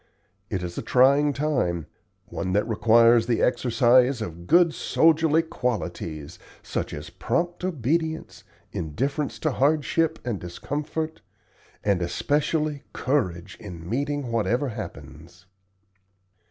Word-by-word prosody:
It 95 - -2
is 85 -1 -5
a - - -3
trying 140 +3 +4
time 130 - -1 0.4
one 95 - -4
that 105 +2 +1
requires 115 +1 +5
the 120 -2 +1
exercise 125 +1 +3
of 85 -5 -7
good 170 -1 +5
soldierly 160 0 +3
qualities, 90 - -4 0.2
such - - -3
as - - -7
prompt 175 +1 -2
obedience, 160 0 -2 0.3
indifference 135 - -2
to 155 - 0
hardship 155 +4 +1
and 115 -6 -2
discomfort, 150 - -4 0.6
and 100 -3 +1
especially 145 - 0
courage 95 -9 -1
in 85 -5 -9
meeting 140 +3 -2
whatever 115 +5 0
happens." 105 -4 -9
125 Hz, 110 wpm, -25 LUFS, 100-150 Hz, 0.6 s, requires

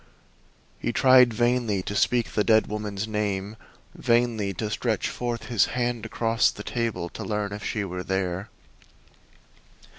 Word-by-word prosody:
He - - -1
tried 130 0 +6
vainly 120 -4 +1
to 100 - -4
speak 120 +2 +2
the 105 - +1
dead 110 -1 +4
woman's 105 0 -4
name, 105 -1 -2 0.4
vainly 115 -4 +1
to 105 +3 -3
stretch 110 -2 -1
forth 120 -1 -3
his 115 -5 +3
hand 120 -2 -1
across 115 0 +2
the - - -8
table 115 -7 -2
to - - -7
learn 105 -2 -2
if 105 +1 -7
she 105 -2 -2
were 90 -1 -5
there. 95 0 -2
110 Hz, 145 wpm, -25 LUFS, 100-120 Hz, 0.4 s, tried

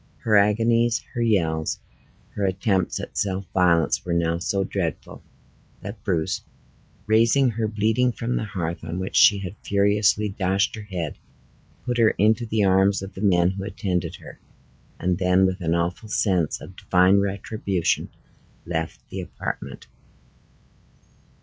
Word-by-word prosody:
Her 110 - +2
agonies, 115 +3 +3
her 120 - -2
yells, 80 -9 0 0.5
her 100 - -4
attempts 95 0 0
at - - -8
self 95 -1 -1
violence, 85 -3 +2
were 85 -1 -2
now 85 0 0
so 95 +2 0
dreadful, 90 -5 -4 0.6
that - - -8
Bruce, 80 -4 -1 0.6
raising 115 +4 +3
her 110 0 -2
bleeding 110 +4 +1
from 120 +2 -3
the - - -1
hearth 85 -5 -4
on 85 +1 -5
which 95 0 -4
she 105 - +7
had 95 -1 -6
furiously 100 +1 +2
dashed 95 +1 0
her 110 - -6
head, 90 -7 -5 0.7
put 120 -1 -1
her 110 -2 +4
into 110 +3 +2
the 110 -1 +1
arms 95 +1 +3
of 95 0 -8
the 95 - -8
men 90 -3 +3
who 95 0 -6
attended 95 -4 -3
her, - - -13 0.6
and 90 +1 0
then, 90 +1 +3
with 95 0 -1
an 85 0 0
awful 90 +6 -2
sense 90 -6 +1
of - - -11
Divine 90 +2 +3
retribution, 100 -2 -1 0.6
left 80 -1 -4
the - - -4
apartment. - - -6
95 Hz, 145 wpm, -24 LUFS, 90-105 Hz, 0.7 s, she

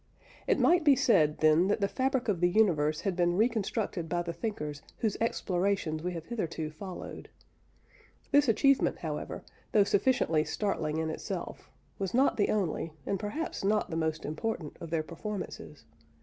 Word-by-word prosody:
It - - +3
might 345 0 +4
be 290 -3 +6
said, 155 - +3
then, 155 +3 +5
that 205 - +1
the 200 - +2
fabric 265 +3 0
of 200 -5 +1
the 175 - +4
universe 165 -7 +2
had 195 -3 -1
been 175 0 +2
reconstructed 215 -6 0
by 175 0 0
the 170 0 -4
thinkers 150 -6 -4 0.2
whose 215 -3 0
explorations 185 -7 0
we 180 +2 -3
have 165 -2 -6
hitherto 165 -8 -3
followed. 180 +4 -8 1.0
This 290 0 +5
achievement, 275 +4 +3
however, - - -5 0.3
though 210 - +6
sufficiently 200 -7 +2
startling 160 -6 -2
in 160 0 -1
itself, - - -6 0.3
was 195 +1 -2
not 265 -1 +3
the 205 - +2
only, 165 -5 -1
and 195 - -1
perhaps 250 - -4
not 205 -1 +1
the - - -2
most 160 -1 -1
important, 155 +1 -3
of 165 - -6
their 160 -1 0
performances. 180 -3 -7
185 Hz, 165 wpm, -30 LUFS, 160-215 Hz, 1.0 s, be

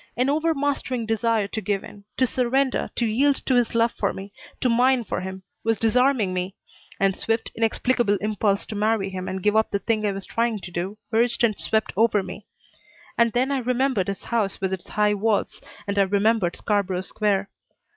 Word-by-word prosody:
An 255 +3 +2
overmastering 285 -6 0
desire 225 -1 +1
to 220 - -3
give 200 0 -1
in; 200 -1 -12
to 260 - +4
surrender, 255 +2 0
to 235 - +1
yield 270 +6 +3
to 265 - +2
his 245 -2 +2
love 230 +1 +3
for 200 - -1
me, 195 +1 -9 0.3
to - - +1
mine 250 +1 +3
for 205 - -3
him, 190 0 -6 0.2
was 225 -1 +1
disarming 230 -3 +2
me, 185 +2 -3 0.4
and 195 -1 +2
swift, 225 0 -2
inexplicable 225 -1 +1
impulse 205 -1 0
to 215 - -7
marry 210 -2 +1
him 185 -1 -5
and 190 -1 -4
give 210 0 +2
up 220 0 +3
the - - 0
thing 215 +1 -1
I - - +1
was 195 0 -6
trying 230 -1 0
to 190 -3 -9
do 185 +4 -4 0.2
urged 235 +1 +2
and 220 -3 +2
swept 220 0 0
over 215 -1 +3
me. 200 +2 -9 0.7
And 235 -1 +3
then 255 +3 +1
I 275 - +1
remembered 250 -4 0
his 200 -1 -4
house 220 -5 -1
with 190 -1 -1
its 185 - -5
high 210 -1 +2
walls. 210 0 0 0.2
And 200 0 -1
I - - +7
remembered 200 -1 +2
Scarborough 195 -3 0
Square. 200 0 -1
220 Hz, 195 wpm, -24 LUFS, 200-240 Hz, 0.7 s, I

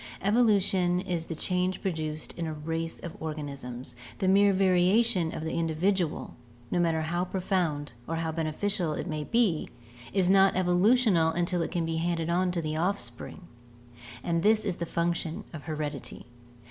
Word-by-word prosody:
Evolution 195 -5 +3
is 175 -3 -3
the 165 - -4
change 180 +3 0
produced 155 -5 -3
in 170 -1 -4
a 155 - -4
race 165 +2 -3
of 170 - -7
organisms; 140 -5 -6 0.2
the 190 - 0
mere 200 +1 +5
variation 185 0 +3
of 155 - -5
the 160 - -3
individual, 170 +1 0 0.4
no 175 - +1
matter 165 -2 +1
how 175 +3 -1
profound 180 - -1
or 165 - -2
how 165 0 -1
beneficial 165 +2 -1
it - - -4
may 155 -4 -3
be, 215 -4 +1 0.4
is 190 -2 +2
not 195 +1 +5
evolutional 185 0 +4
until 175 +1 0
it - - -1
can 170 -2 -1
be 165 0 -2
handed 170 0 -1
on 180 +1 +2
to 175 -2 -2
the 155 0 -2
offspring, 180 +1 -3 0.8
and 170 -1 0
this 215 +3 +3
is 190 -4 -1
the 170 - -3
function 170 -1 -1
of 150 -5 -8
heredity. 150 -3 -5
170 Hz, 160 wpm, -28 LUFS, 160-190 Hz, 0.8 s, mere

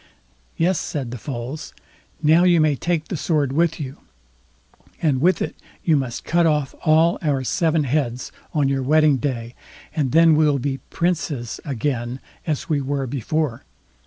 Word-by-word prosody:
"Yes", 175 +2 +2
said 135 -6 -4
the 125 - -6
Foals, 130 +5 -6 0.5
"now 160 +3 +5
you 175 -2 +5
may 155 -2 +3
take 165 +2 -1
the 185 - -3
sword 145 -2 0
with 165 +2 +1
you, 135 -1 -6 1.0
and 140 -5 +1
with 180 +4 +3
it - - -5 0.3
you 160 - +3
must 130 -4 -2
cut 170 0 +3
off 150 -3 0
all 160 +2 +4
our 140 -4 0
seven 160 +3 +1
heads 130 -3 -1 0.2
on 145 -3 +1
your 135 0 0
wedding 150 +1 +4
day, 120 -2 -3 0.4
and 140 -5 0
then 165 0 +6
we'll 150 -2 +3
be 135 +1 -2
princes 150 -9 -2
again 125 -2 -2 0.3
as 150 -3 -2
we 150 -3 +1
were 135 0 -2
before. 140 +1 -2
145 Hz, 160 wpm, -22 LUFS, 130-160 Hz, 1.0 s, then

